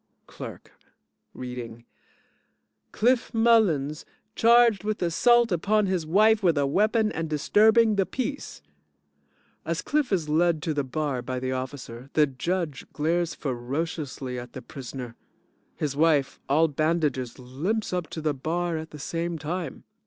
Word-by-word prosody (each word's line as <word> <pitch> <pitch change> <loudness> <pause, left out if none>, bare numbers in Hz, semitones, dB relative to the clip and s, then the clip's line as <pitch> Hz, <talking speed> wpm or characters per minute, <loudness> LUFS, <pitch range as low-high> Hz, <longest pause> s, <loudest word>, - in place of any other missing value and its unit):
CLERK - - -10 0.6
(Reading) 120 -2 -7 1.1
Cliff 240 +2 +2
Mullins, 195 -11 +3 0.3
charged 230 -4 +5
with 215 0 -2
assault 235 +7 +4
upon 205 +5 +2
his 185 -4 -1
wife 215 +5 +4
with 170 -5 +3
a 140 - +2
weapon 215 - +2
and 160 -4 -3
disturbing 215 +8 +4
the 195 - +3
peace. 275 +2 -5 1.0
(As - - -2
CLIFF 295 -5 0
is 175 -6 0
led 160 0 +2
to 160 - -1
the 145 -1 0
bar 135 -1 -2
by 130 +1 -4
the 130 0 -2
officer, 130 -1 -6
the 150 - +5
JUDGE 150 +2 -3
glares 165 +2 0
ferociously 135 0 -4
at 120 0 -10
the 130 - -8
prisoner. 125 -2 -8 0.6
His 145 -2 -2
wife, 150 -3 +2
all 155 +4 +4
bandages, 150 -5 -1
limps 155 - -3
up 180 -3 -1
to 160 - -6
the 155 -1 0
bar 165 +4 -2
at 160 +1 -6
the 150 - -10
same 165 +3 -3
time.) 160 0 -5
160 Hz, 140 wpm, -26 LUFS, 135-195 Hz, 1.1 s, charged